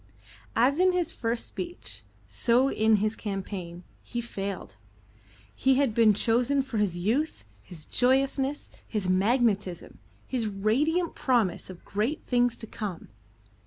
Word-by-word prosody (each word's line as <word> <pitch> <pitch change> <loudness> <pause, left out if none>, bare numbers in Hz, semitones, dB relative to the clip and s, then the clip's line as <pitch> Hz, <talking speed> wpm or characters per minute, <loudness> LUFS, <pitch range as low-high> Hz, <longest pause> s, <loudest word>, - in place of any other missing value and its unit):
As 265 +7 +3
in 370 0 +4
his 350 -2 0
first 230 -3 -2
speech, 350 -1 -5 0.3
so 250 +3 +2
in 220 0 +3
his 215 +1 0
campaign, 190 -4 -5 0.2
he 240 - -5
failed. 200 -4 -5 0.8
He 265 0 +3
had 270 -4 +2
been 220 -2 +5
chosen 245 +6 +2
for 255 -5 -3
his 195 -4 0
youth, 225 - -1 0.2
his 155 - -9
joyousness, 270 +2 +1 0.2
his 210 -4 -2
magnetism, 200 -1 +1 0.3
his 240 -4 -2
radiant 270 - +1
promise 230 -11 0
of 185 -2 -11
great 220 +10 -1
things 245 -1 +2
to - - -6
come. 205 -5 -6
230 Hz, 130 wpm, -28 LUFS, 200-265 Hz, 0.8 s, been